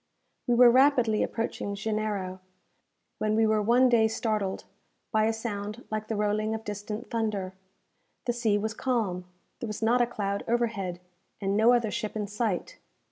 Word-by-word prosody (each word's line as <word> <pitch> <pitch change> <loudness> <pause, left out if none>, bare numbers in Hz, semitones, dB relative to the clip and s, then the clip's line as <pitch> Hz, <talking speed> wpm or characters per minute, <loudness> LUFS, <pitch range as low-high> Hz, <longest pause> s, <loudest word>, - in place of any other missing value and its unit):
We 240 - +3
were 245 0 +8
rapidly 255 -4 +4
approaching 225 -3 -2
Janeiro, 205 -3 -2 0.8
when 215 0 +1
we 225 0 +4
were 215 -1 +2
one 240 +5 +4
day 230 -3 +4
startled 215 -3 -2 0.5
by 215 -1 +3
a 225 - +2
sound 215 0 -5
like 215 0 -3
the 220 - -2
rolling 210 +1 0
of 220 - -6
distant 210 +2 -6
thunder. 210 -5 -2 0.7
The 240 - +1
sea 225 -3 +1
was 220 +2 -2
calm; 220 -8 -1 0.3
there 235 - -4
was 215 +1 -5
not 240 +2 +4
a 240 - +3
cloud 200 -4 -3
overhead, 220 -7 -1 0.4
and 195 -1 -1
no 220 +3 +5
other 235 -3 +1
ship 215 -1 -3
in 210 -1 -1
sight. 210 -2 -3
215 Hz, 165 wpm, -28 LUFS, 205-235 Hz, 0.8 s, were